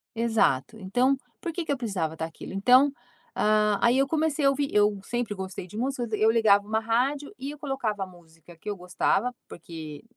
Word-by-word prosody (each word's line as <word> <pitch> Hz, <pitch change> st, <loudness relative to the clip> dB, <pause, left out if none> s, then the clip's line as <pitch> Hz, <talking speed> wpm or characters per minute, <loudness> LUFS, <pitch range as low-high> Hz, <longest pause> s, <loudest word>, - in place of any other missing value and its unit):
Exato, 225 Hz, -, +1 dB
então 245 Hz, +8 st, +2 dB, 0.2 s
por 340 Hz, -3 st, -4 dB
que 345 Hz, -, -3 dB
que -, -, -2 dB
eu 280 Hz, -, 0 dB
precisava 190 Hz, -10 st, -2 dB
daquilo, 160 Hz, +3 st, -6 dB
então, 250 Hz, +8 st, +5 dB, 0.5 s
hã, 210 Hz, -1 st, +3 dB
aí 240 Hz, +2 st, +4 dB
eu 275 Hz, -, +3 dB
comecei 310 Hz, -1 st, 0 dB
a -, -, +7 dB
ouvir 275 Hz, 0 st, 0 dB
eu 205 Hz, -1 st, +3 dB
sempre 240 Hz, -1 st, -2 dB
gostei 190 Hz, -1 st, -6 dB
de 210 Hz, -, -10 dB
música, 255 Hz, +1 st, -1 dB
eu 220 Hz, +1 st, +4 dB
ligava 210 Hz, -3 st, +4 dB
um -, -, -11 dB, 0.2 s
rádio 275 Hz, +5 st, +1 dB
e 275 Hz, +2 st, -4 dB
eu 295 Hz, -, -11 dB
colocava 265 Hz, -9 st, -2 dB
música 170 Hz, -2 st, -17 dB
que 165 Hz, -, -17 dB
eu 205 Hz, -, -2 dB
gostava, 185 Hz, +6 st, 0 dB, 0.2 s
porque 160 Hz, -2 st, -9 dB
220 Hz, 190 wpm, -27 LUFS, 190-270 Hz, 0.5 s, a